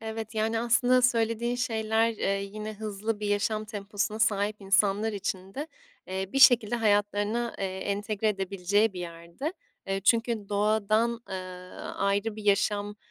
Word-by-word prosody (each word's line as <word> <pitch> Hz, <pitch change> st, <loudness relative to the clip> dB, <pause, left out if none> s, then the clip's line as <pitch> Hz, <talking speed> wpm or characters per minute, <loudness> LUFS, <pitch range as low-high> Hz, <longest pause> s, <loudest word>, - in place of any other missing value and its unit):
Evet, 220 Hz, 0 st, -6 dB
yani, 220 Hz, +1 st, 0 dB
aslında 245 Hz, +2 st, +3 dB
söylediğin 235 Hz, 0 st, +1 dB
şeyler, 225 Hz, -2 st, +1 dB
eee, 195 Hz, -2 st, -1 dB
yine 215 Hz, 0 st, -5 dB
hızlı 215 Hz, 0 st, -4 dB
bir 210 Hz, -, -2 dB
yaşam 215 Hz, +1 st, 0 dB
temposuna 210 Hz, 0 st, -3 dB
sahip 210 Hz, -1 st, +1 dB
insanlar 200 Hz, +2 st, +2 dB
için 190 Hz, -1 st, -4 dB
de, 290 Hz, +3 st, -4 dB, 0.4 s
eee, 190 Hz, 0 st, -3 dB
bir 270 Hz, -, +1 dB
şekilde 240 Hz, -3 st, +6 dB
hayatlarına, 210 Hz, +1 st, +1 dB
eee, -, -, -2 dB
entegre 205 Hz, +2 st, -1 dB
edebileceği 195 Hz, +1 st, +1 dB
bir 180 Hz, -, -6 dB
yerde. 170 Hz, -, -6 dB, 0.3 s
Eee, 195 Hz, 0 st, -1 dB
çünkü 225 Hz, 0 st, +1 dB
doğadan, 215 Hz, +3 st, +1 dB
ııı, 185 Hz, -1 st, -7 dB
ayrı 200 Hz, +2 st, 0 dB
bir 215 Hz, -, -8 dB
yaşam, 205 Hz, 0 st, +1 dB
210 Hz, 140 wpm, -28 LUFS, 200-225 Hz, 0.4 s, şekilde